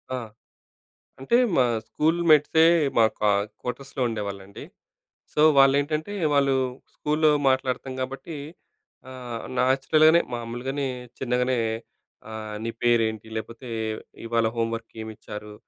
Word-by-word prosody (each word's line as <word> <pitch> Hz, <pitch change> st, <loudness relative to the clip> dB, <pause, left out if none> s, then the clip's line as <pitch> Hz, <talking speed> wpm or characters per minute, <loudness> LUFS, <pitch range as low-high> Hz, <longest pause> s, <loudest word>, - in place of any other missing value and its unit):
ఆ! -, -, -2 dB, 1.0 s
అంటే, 135 Hz, -, +2 dB, 0.2 s
మా 130 Hz, -, +5 dB, 0.2 s
స్కూల్‌మేట్సే 160 Hz, 0 st, +3 dB, 0.3 s
మా 115 Hz, -, +7 dB, 0.2 s
కా 105 Hz, -1 st, +3 dB, 0.3 s
క్వార్టర్స్‌లో 135 Hz, +3 st, -6 dB
ఉండేవాళ్ళండి. 100 Hz, -3 st, -6 dB, 0.7 s
సో, 150 Hz, -, +1 dB, 0.2 s
వాళ్ళు 135 Hz, 0 st, +7 dB
ఏంటంటే, 155 Hz, +6 st, -2 dB, 0.2 s
వాళ్ళు 140 Hz, -1 st, +3 dB, 0.4 s
స్కూల్‌లో 150 Hz, +1 st, +2 dB, 0.2 s
మాట్లాడతాం 130 Hz, 0 st, -1 dB
కాబట్టి, 135 Hz, +5 st, -5 dB, 0.7 s
ఆహ్, 125 Hz, -3 st, -7 dB, 0.2 s
నేచురల్‍ 135 Hz, +4 st, +3 dB
గానే, 170 Hz, +2 st, +5 dB
మామూలుగానే, 120 Hz, +4 st, -3 dB, 0.3 s
చిన్నగనే, 125 Hz, 0 st, 0 dB, 0.7 s
ఆహ్, 110 Hz, -1 st, -6 dB
నీ 115 Hz, -, -2 dB
పేరేంటి? 110 Hz, -2 st, +2 dB
లేకపోతే 115 Hz, +3 st, -6 dB, 0.6 s
ఇవాళ 115 Hz, -1 st, +1 dB
హోమ్ 115 Hz, 0 st, 0 dB
వర్క్ 115 Hz, 0 st, -10 dB
ఏమిచ్చారు? 105 Hz, -1 st, -9 dB
125 Hz, 105 wpm, -25 LUFS, 115-140 Hz, 1.0 s, మా